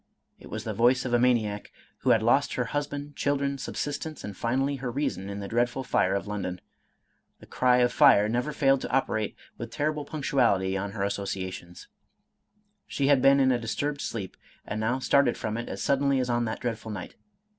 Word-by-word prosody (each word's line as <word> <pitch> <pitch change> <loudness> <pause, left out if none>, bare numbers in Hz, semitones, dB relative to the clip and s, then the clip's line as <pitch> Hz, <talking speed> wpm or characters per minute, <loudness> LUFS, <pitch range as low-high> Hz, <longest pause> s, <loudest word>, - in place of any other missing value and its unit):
It - - -13
was - - -5
the - - -3
voice, 125 +3 +3
of 125 - -2
a 120 - +4
maniac, 110 -5 +1 0.3
who - - 0
had 110 - +4
lost 135 +5 +2
her 125 - 0
husband, 145 0 -3
children, 140 -1 -1
subsistence, 150 +3 -4
and 100 -1 -6
finally 135 +6 0
her 130 -1 -4
reason, 120 -7 -2
in 100 0 -5
the 100 - -5
dreadful 120 +4 0
fire 95 -6 +1
of 100 - -2
London. 100 -3 -4 0.8
The - - -14
cry 125 -1 +2
of 120 0 +2
fire 135 -8 +6
never 120 +6 -1
failed 135 -2 +2
to - - -4
operate 110 -5 0 0.2
with - - -5
terrible 150 0 -1
punctuality 120 -11 +1
on 100 +1 -3
her 100 -3 -2
associations. 95 -3 -4 1.0
She 140 0 0
had 140 -3 +5
been 140 +1 +6
in 130 -1 +4
a 125 - +1
disturbed 145 +5 -3
sleep, 100 -5 -5 0.3
and 110 - -4
now 115 +4 0
started 135 -1 +2
from 110 0 -3
it 120 +1 -4
as - - -5
suddenly 140 -1 +2
as 125 -1 0
on 120 0 +1
that 110 - -4
dreadful 115 -2 -4
night. 105 -4 -6
120 Hz, 195 wpm, -27 LUFS, 105-140 Hz, 1.0 s, fire